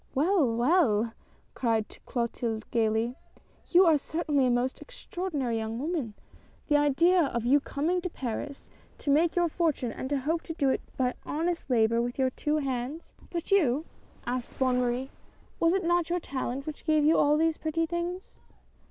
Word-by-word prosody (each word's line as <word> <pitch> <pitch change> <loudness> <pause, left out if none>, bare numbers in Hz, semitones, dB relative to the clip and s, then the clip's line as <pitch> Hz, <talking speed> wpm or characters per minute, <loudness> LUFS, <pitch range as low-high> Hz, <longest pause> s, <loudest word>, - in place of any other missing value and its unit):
"Well! 320 +1 +3
well!" 235 - +3 0.4
cried 225 -3 0 0.2
Clotilde, 235 -2 -2
gayly, 225 +2 +1 0.5
"you 370 +2 +6
are 320 -3 +5
cer 320 +5 -4
tainly 285 -4 +2
a - - +2
most 245 +2 0
extraordinary 345 - -3
young 220 0 -3
woman. 280 -6 -3 0.5
The 295 - +5
idea 330 +6 +4
of 235 -4 -2
your 275 +4 +5
coming 315 +6 -1
to 360 - -3
Paris 275 0 -6 0.3
to 285 - -1
make 320 +4 +3
your 350 -1 +3
fortune, 310 -7 0
and 260 - -5
to 285 - +1
hope 320 +5 0
to 325 - -5
do 280 -4 +1
it - - -1 0.2
by 255 -1 +1
honest 335 0 -2
labor 230 -1 +3
with 245 +1 -3
your 260 -1 +2
two 300 +3 -1
hands! 270 +2 -4
" - - -24
" - - -20
But 340 +1 -4
you? 310 -6 +3 0.2
" - - -28
asked 245 0 -4
Bonne 255 -1 +2
Marie; 250 +2 -1 0.2
" - - -32
was 335 +2 +3
it 385 - 0
not 345 -1 +2
your 350 +1 +1
talent 270 -3 -4
which 310 -1 -7
gave 310 -2 +3
you 315 - +5
all 295 +1 +4
these 320 0 +1
pretty 325 +1 0
things 345 +2 -5
285 Hz, 185 wpm, -28 LUFS, 245-330 Hz, 0.5 s, you